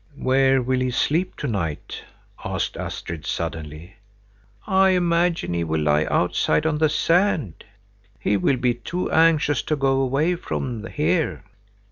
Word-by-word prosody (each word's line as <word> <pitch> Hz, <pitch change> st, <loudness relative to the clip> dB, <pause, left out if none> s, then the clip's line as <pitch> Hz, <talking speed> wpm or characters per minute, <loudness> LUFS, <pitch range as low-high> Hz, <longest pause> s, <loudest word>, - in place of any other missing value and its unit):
"Where 135 Hz, 0 st, +2 dB
will 130 Hz, +1 st, 0 dB
he 130 Hz, 0 st, 0 dB
sleep 160 Hz, +8 st, 0 dB
to -, -, -4 dB
night?" 85 Hz, -9 st, -4 dB, 0.4 s
asked -, -, -3 dB
Astrid, 80 Hz, -2 st, -6 dB
suddenly. 80 Hz, +4 st, -5 dB, 0.7 s
"I 190 Hz, 0 st, +4 dB
imagine 170 Hz, -, +1 dB
he 85 Hz, -1 st, -1 dB
will 80 Hz, -1 st, -1 dB
lie 75 Hz, 0 st, +2 dB
outside 150 Hz, -, +1 dB
on 155 Hz, -1 st, 0 dB
the 155 Hz, -1 st, +3 dB
sand. 165 Hz, -, +1 dB, 0.6 s
He 105 Hz, -, +1 dB
will 130 Hz, +7 st, +1 dB
be 125 Hz, -1 st, +1 dB
too 170 Hz, +9 st, -4 dB
anxious 160 Hz, -2 st, +3 dB
to 155 Hz, -, -1 dB
go 135 Hz, -1 st, +1 dB
away 140 Hz, +7 st, +1 dB
from 120 Hz, -9 st, -4 dB
here." 155 Hz, +4 st, -1 dB
135 Hz, 140 wpm, -23 LUFS, 100-165 Hz, 0.7 s, I